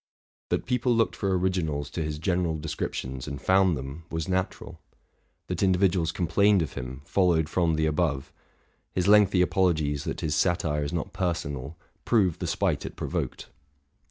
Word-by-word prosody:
That - - 0
people 125 -1 +1
looked 115 0 +2
for 95 -2 0
originals 80 -6 -1
to 85 - -3
his 75 -1 -3
general 85 0 0
descriptions 65 -4 -4
and 70 -1 -5
found 95 +1 +3
them, 70 +5 -7
was 80 -1 -3
natural; 95 0 -3 0.6
that 90 -1 -3
individuals 95 -3 +2
complained 95 +2 +3
of 75 - -6
him, 65 +3 -7
followed 85 -4 +2
from 85 0 +1
the 80 0 +1
above; 75 -4 -1 0.6
his 90 0 0
lengthy 100 -3 +6
apologies 80 -6 +1
that - - -4
his 75 - -1
satire 75 -2 +1
is 70 - -3
not 85 -3 -3
personal, 75 -5 -3 0.3
prove 95 -8 +2
the - - -3
spite - - 0
it - - -7
provoked. - - -4
85 Hz, 155 wpm, -27 LUFS, 75-95 Hz, 0.6 s, lengthy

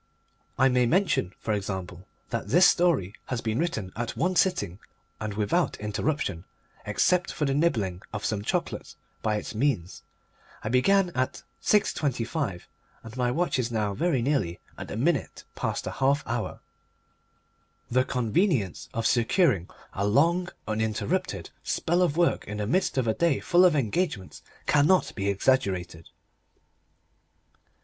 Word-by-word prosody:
I 130 - +5
may 125 -2 +3
mention, 170 - +2
for 110 - -2
example, 95 -2 -4 0.2
that 115 - -2
this 180 +2 +6
story 160 - +3
has 125 - -2
been 110 0 -2
written 110 - -2
at 120 0 -4
one 180 +2 +1
sitting 105 - +1 0.4
and 110 -2 -4
without 105 -1 0
interruption, 105 - -2 0.4
except 175 - +2
for 150 - -1
the 135 - +1
nibbling 110 - 0
of 105 0 -4
some 105 -1 -1
chocolate, - - -3 0.3
by 105 -1 0
its 105 - -4
means. 110 -7 -1 0.6
I 105 - -2
began 180 - +3
at 130 -4 -2 0.2
6.25, 135 - 0 0.4
and 115 0 -10
my 125 -1 +1
watch 165 +1 0
is 120 -1 -1
now 105 -3 0
very 150 - +1
nearly 120 - 0 0.2
at - - -7
the - - -5
minute 145 +4 0
past - - -2
the - - -4
half 140 +2 +1
hour. - - -3 1.3
The 130 +1 +4
convenience 125 - 0
of 115 0 -1
securing 115 - +2 0.2
a 100 +1 -1
long, 170 - +3 0.2
uninterrupted 110 0 -2
spell 175 +2 0
of 170 -4 +1
work 175 -1 +2
in 105 - -5
the 105 - -2
midst 180 - 0
of 125 -3 +1
a 110 - +3
day 170 -1 +2
full 175 +1 +4
of 175 -4 +5
engagements 130 - -1 0.2
cannot 150 +6 +3
be 100 -1 -1
exaggerated. 95 -7 0
125 Hz, 145 wpm, -27 LUFS, 105-160 Hz, 1.3 s, this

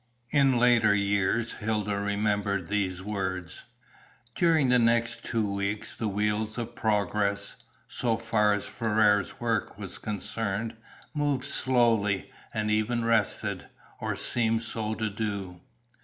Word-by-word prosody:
In 135 -4 +4
later 120 -3 +5
years 100 +3 +1
Hilda 105 -1 -1
remembered 100 -2 0
these 95 -3 -1
words. 95 -4 -4 0.7
During 160 -5 +3
the 125 0 +5
next 115 0 +2
two 115 -3 0
weeks 100 +1 -2
the 110 - -3
wheels 105 +2 -1
of 120 0 -4
progress, 100 -3 0 0.3
so 115 -3 0
far 110 -2 +2
as 100 - -2
Ferrars' 105 -3 +2
work 115 -4 -1
was 100 -3 -6
concerned, 110 +1 -3 0.4
moved 145 -4 0
slowly, 115 -8 +2 0.2
and 105 -1 -1
even 115 +2 +1
rested, 115 -3 0 0.3
or - - -2
seemed 115 -1 0
so 110 -1 -3
to 110 0 -1
do. 100 -4 -4
110 Hz, 125 wpm, -28 LUFS, 100-115 Hz, 0.7 s, later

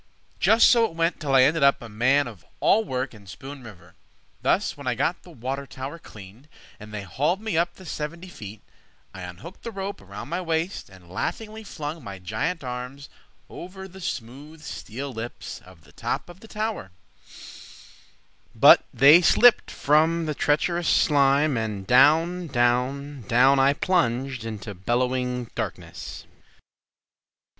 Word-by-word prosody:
Just 225 +1 +6
so 235 -2 +5
it 165 - -6
went 165 +1 0
till 140 -4 0
I 130 - +7
ended 155 +4 +2
up 140 0 +5
A 120 - -9
man 130 +7 +2
of 105 -10 -11 0.2
all 225 - +4
work 130 - -3
in 105 -3 -15
Spoon 135 +8 -9
River. 110 -6 -14 0.5
Thus - - +1
when - - -9
I - - +1
got - - -1
the - - -16
water 135 +3 -5
tower 135 +6 -7
cleaned, 105 +3 -14 0.3
And 105 0 -11
they 105 -2 -5
hauled 150 - 0
me 220 -4 -3
up 170 +1 +1
the 185 - -14
seventy 165 +3 -5
feet, 105 - -10 0.5
I 95 - -9
unhooked 90 - -10
the - - -6
rope 200 -2 -5
from 100 +4 -9
my 175 +5 -3
waist, 165 +2 -2
And 95 -2 -17
laughingly 220 - -4
flung 155 -5 -6
my 100 -3 -7
giant 110 - -3
arms 125 +3 -6 0.4
Over 190 +2 -9
the 190 +1 -13
smooth 145 +3 -7
steel 135 +2 -6
lips 115 +1 -7
of 90 -4 -17
the - - -19
top - - -4
of 175 +1 -13
the 225 - -14
tower— 215 - -4 1.7
But - - +8
they 150 +6 +7
slipped 240 +7 +5
from 160 +3 +2
the 155 - -2
treacherous 170 +4 +1
slime, 140 -1 +3
And 105 -3 -3
down, 165 - +4
down, 130 +2 0
down, 130 +4 +5
I 135 +1 +5
plunged 135 -7 0 0.2
Through 105 - -6
bellowing 125 +4 -1
darkness! - - -6
140 Hz, 155 wpm, -25 LUFS, 120-170 Hz, 1.7 s, But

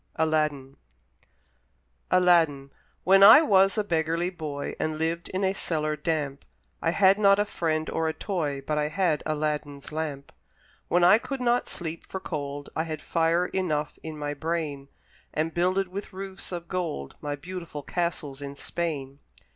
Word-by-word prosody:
(Adapted) 150 -4 0 1.3
ALADDIN 165 -7 +3 0.3
When 195 +1 +6
I 220 +10 +10
was 195 -5 +4
a 215 - +2
beggarly 165 -1 0
boy 150 -5 -5
And 155 0 -1
lived 165 +2 -2
in 185 +1 -2
a 190 0 +2
cellar 155 -5 -1
damp, 150 -4 -2 0.4
I 165 - +1
had 190 +3 +4
not 200 -1 +6
a 205 - +2
friend 160 -5 -1
or 160 - -1
a 160 - 0
toy, 155 -9 -2
But 150 -1 0
I 150 - +1
had 160 -1 +1
Aladdin's 150 -2 -3
lamp; 150 -3 -4 0.6
When 175 0 +3
I 185 +5 +7
could 275 +2 -5
not 245 0 +1
sleep 165 -1 -6
for 190 - -5
cold, 145 -4 -5
I 160 - 0
had 155 -2 -4
fire 165 +1 +2
enough 155 -6 -2
in 160 -1 -7
my 145 0 -3
brain, 150 -3 -3 0.5
And 160 +1 0
builded 185 +2 +1
with 195 +2 -7
roofs 190 0 -7
of 175 -1 -5
gold 170 - -3
My 145 -1 -3
beautiful 170 -1 -7
castles 150 -4 -3
in 140 0 -6
Spain! 140 -4 -4
160 Hz, 160 wpm, -27 LUFS, 150-185 Hz, 1.3 s, I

